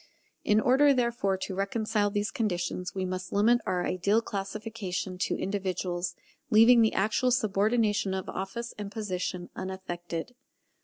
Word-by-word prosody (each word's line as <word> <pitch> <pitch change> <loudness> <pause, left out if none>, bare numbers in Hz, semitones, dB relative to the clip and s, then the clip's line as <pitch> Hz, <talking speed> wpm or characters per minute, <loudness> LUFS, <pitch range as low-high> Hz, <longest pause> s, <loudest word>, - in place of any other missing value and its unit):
In 210 0 +4
order, 270 +4 +5
therefore, 235 -6 +1
to 190 +1 -5
reconcile 205 +2 0
these 205 +1 -1
conditions, 180 -6 -2
we 190 -1 -1
must 185 0 -4
limit 235 +4 +4
our 180 -1 0
ideal 200 +4 +2
classification 195 -3 -4
to - - 0
individuals, 185 -2 -2 0.3
leaving 230 +2 +7
the 220 - +3
actual 220 +6 +2
subordination 210 -3 +1
of 190 - -4
office 235 +5 -5
and 200 -1 -5
position 185 -4 -4
unaffected. 180 0 -5
200 Hz, 135 wpm, -28 LUFS, 185-225 Hz, 0.3 s, leaving